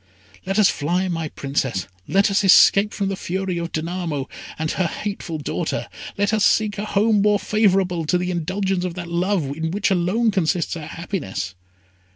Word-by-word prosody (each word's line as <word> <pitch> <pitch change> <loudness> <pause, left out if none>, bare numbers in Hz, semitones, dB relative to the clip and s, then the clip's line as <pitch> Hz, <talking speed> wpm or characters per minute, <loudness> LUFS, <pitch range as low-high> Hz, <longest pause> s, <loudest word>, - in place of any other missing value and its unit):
Let 195 +1 -1
us 210 -3 +6
fly, 175 +5 0
my 165 -3 -2
Princess. 135 - -2 0.2
Let 200 +1 +3
us 200 - +2
escape 200 +2 +6
from 195 -1 -2
the 195 - -2
fury 185 -1 -3
of 170 0 -4
Danamo 165 -3 -3 0.3
and 160 0 -1
her 185 - 0
hateful 195 -4 -4
daughter. 150 - -3 0.3
Let 205 +1 +1
us 215 -2 +2
seek 210 -1 +2
a 210 - -2
home 210 0 +2
more 210 0 +4
favourable 190 -5 +1
to 180 - +3
the 180 0 -2
indulgence 185 +2 -1
of 180 -2 -3
that 175 -2 -6
love, 170 -5 0
in 160 +1 -2
which 200 +3 0
alone 195 +6 +2
consists 175 -2 0
our 155 -3 -7
happiness!" 160 - -4
185 Hz, 180 wpm, -22 LUFS, 165-200 Hz, 0.3 s, us